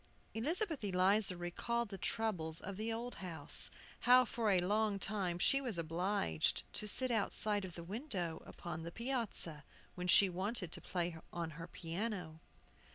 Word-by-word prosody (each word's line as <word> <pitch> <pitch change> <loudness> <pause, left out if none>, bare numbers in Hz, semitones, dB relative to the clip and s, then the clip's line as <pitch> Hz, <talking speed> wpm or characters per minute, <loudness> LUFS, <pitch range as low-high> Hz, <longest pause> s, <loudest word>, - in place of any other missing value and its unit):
Elizabeth 315 - -1
Eliza 195 0 +3
recalled 230 +7 -2
the 195 - -6
troubles 175 -9 0
of 200 0 -6
the 220 +3 -3
old 235 +2 -4
house, 175 -4 +4 0.3
how 250 +1 +6
for 225 -1 -1
a 195 - +4
long 205 +3 +1
time 190 -3 -1
she 275 +9 +4
was 240 -9 -1
obliged 165 - 0
to 210 - -2
sit 255 +4 +2
outside 210 -1 +1
of 180 - -9
the 170 - -7
window 190 - -4
upon 170 -2 -6
the 170 +1 -6
piazza, 230 - -2 0.3
when 180 0 -4
she 195 +2 +8
wanted 185 0 -2
to - - -6
play 175 -2 -2 0.2
on 170 -2 -4
her 165 +2 -8
piano. 175 -1 -4
195 Hz, 160 wpm, -36 LUFS, 175-225 Hz, 0.3 s, she